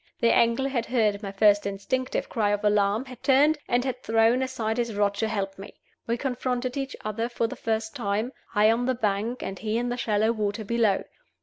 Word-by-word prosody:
The 230 Hz, -, +4 dB
angler 235 Hz, +4 st, +3 dB
had 240 Hz, -4 st, -2 dB
heard 215 Hz, -5 st, +1 dB
my 200 Hz, -3 st, -5 dB
first 205 Hz, 0 st, +4 dB
instinctive 255 Hz, +6 st, -2 dB
cry 215 Hz, -4 st, 0 dB
of 205 Hz, +1 st, -1 dB
alarm, 210 Hz, +3 st, +2 dB
had 255 Hz, -2 st, -11 dB
turned, 290 Hz, +3 st, +4 dB
and 245 Hz, +1 st, +1 dB
had 260 Hz, -, -3 dB
thrown 225 Hz, +3 st, +3 dB
aside 235 Hz, -4 st, -2 dB
his 235 Hz, -3 st, -1 dB
rod 205 Hz, -1 st, +2 dB
to 220 Hz, -, 0 dB
help 195 Hz, -3 st, -3 dB
me. 195 Hz, -, -10 dB, 0.3 s
We 235 Hz, +1 st, 0 dB
confronted 250 Hz, -1 st, -2 dB
each 270 Hz, -1 st, -3 dB
other 225 Hz, +2 st, -2 dB
for 235 Hz, -1 st, -1 dB
the 225 Hz, -, -4 dB
first 220 Hz, -1 st, -2 dB
time, 215 Hz, +1 st, -1 dB, 0.2 s
I 210 Hz, +1 st, +5 dB
on 240 Hz, +2 st, 0 dB
the 260 Hz, -, +1 dB
bank 220 Hz, +2 st, -1 dB
and 195 Hz, -1 st, -5 dB
he 220 Hz, +1 st, -1 dB
in 245 Hz, +1 st, -1 dB
the 245 Hz, -, -2 dB
shallow 220 Hz, -1 st, +1 dB
water 215 Hz, -1 st, -2 dB
below. 225 Hz, -3 st, +2 dB
225 Hz, 210 wpm, -26 LUFS, 205-245 Hz, 0.3 s, I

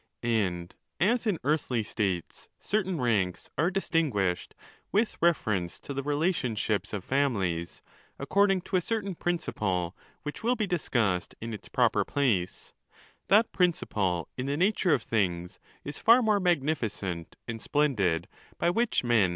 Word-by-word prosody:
And, 95 Hz, -7 st, 0 dB, 0.3 s
as 230 Hz, +5 st, +2 dB
in 200 Hz, -5 st, +2 dB
earthly 135 Hz, -5 st, +1 dB
states 95 Hz, -5 st, -3 dB
certain 190 Hz, -5 st, -1 dB
ranks 105 Hz, -8 st, 0 dB
are 160 Hz, +5 st, +2 dB
distinguished 150 Hz, -, 0 dB, 0.4 s
with 215 Hz, +3 st, +1 dB
reference 105 Hz, -, +1 dB
to 140 Hz, -, -6 dB
the 140 Hz, -, -2 dB
relation 145 Hz, -4 st, 0 dB
ships 105 Hz, 0 st, -1 dB
of 100 Hz, -3 st, -4 dB
families, 100 Hz, -12 st, -1 dB, 0.3 s
according 195 Hz, +6 st, +2 dB
to 185 Hz, -, -1 dB
a -, -, +1 dB
certain 205 Hz, 0 st, -2 dB
principle 95 Hz, -, -1 dB, 0.3 s
which 150 Hz, -, -5 dB
will 240 Hz, +3 st, +2 dB
be 215 Hz, -, 0 dB
discussed 115 Hz, -, 0 dB
in 115 Hz, 0 st, -5 dB
its 105 Hz, -, -9 dB
proper -, -, +3 dB
place, 110 Hz, -11 st, -1 dB, 0.5 s
that 215 Hz, +3 st, +5 dB
principle, 105 Hz, -, 0 dB
in 130 Hz, +1 st, -3 dB
the 140 Hz, +1 st, -1 dB
nature 190 Hz, 0 st, +2 dB
ef 120 Hz, -, -4 dB
things, 90 Hz, -5 st, -1 dB, 0.2 s
is 145 Hz, +1 st, -6 dB
far 240 Hz, +2 st, +6 dB
more 215 Hz, -2 st, +3 dB
magnificent 125 Hz, -, -1 dB
and 115 Hz, -1 st, -5 dB
splendid 110 Hz, -, +1 dB, 0.3 s
by 170 Hz, -, +2 dB
which 230 Hz, -, +1 dB
men 120 Hz, -, -4 dB
ON 120 Hz, -2 st, +5 dB
THE -, -, +5 dB
LAWS. -, -, 0 dB
135 Hz, 150 wpm, -28 LUFS, -, 0.5 s, far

